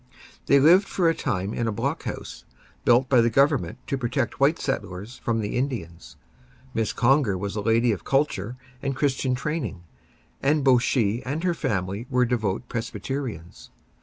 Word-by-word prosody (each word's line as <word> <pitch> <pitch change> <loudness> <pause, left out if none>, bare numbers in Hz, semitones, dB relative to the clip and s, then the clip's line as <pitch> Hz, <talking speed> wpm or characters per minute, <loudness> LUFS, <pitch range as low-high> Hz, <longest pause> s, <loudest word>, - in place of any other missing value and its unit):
They 140 - +6
lived 175 +8 +6
for 180 -3 +1
a - - +2
time 100 - -2
in 120 - -1
a - - 0
block 105 - -2
house, - - -6 0.4
built 120 +2 +5
by 125 -3 +5
the 115 - +3
Government 135 - +2
to 135 - -2
protect 125 +1 -2
white 140 +4 +4
settlers 105 -2 -4
from 115 -1 -1
the 105 - -3
Indians. 115 -11 -4 0.6
Miss 110 -2 0
Conger 125 -5 +2
was 100 +2 -4
a 105 - -1
lady 115 +2 +3
of 100 - -3
culture 125 -5 0 0.2
and 135 -1 -2
Christian 130 -2 0
training, 135 - -3 0.6
and 145 +1 +2
both 130 -3 +5
she 120 -2 +1
and 145 +6 -4
her 180 -1 +2
family 105 - -2
were 125 -1 +3
devoted 115 -3 -1
Presbyterians. 115 - -5
125 Hz, 165 wpm, -25 LUFS, 105-135 Hz, 0.6 s, They